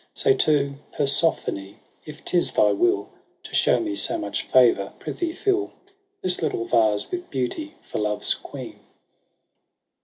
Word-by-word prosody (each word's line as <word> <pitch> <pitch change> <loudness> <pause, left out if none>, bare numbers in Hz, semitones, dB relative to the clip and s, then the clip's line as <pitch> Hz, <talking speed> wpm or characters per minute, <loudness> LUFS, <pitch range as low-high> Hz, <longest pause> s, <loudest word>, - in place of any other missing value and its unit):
Say 425 - +3
to 140 - 0 0.2
Persephonfe, 135 -9 +1 0.3
If 150 - -12
'tis 175 -1 +2
thy - - +3
'will 360 +3 0 0.3
To - - -12
shenxj - - +2
me 320 -1 -4
so 330 +1 +6
much 320 - -5
favour^ 120 -6 +3
frithee 345 -2 -4
fill 395 0 -1 0.5
This 180 -1 +4
little 115 - -2
vase 110 -3 0
'with 360 0 -6
beauty 145 - -4
for - - -6
Love's 105 0 +1
queen. - - -10
150 Hz, 135 wpm, -23 LUFS, -, 0.5 s, so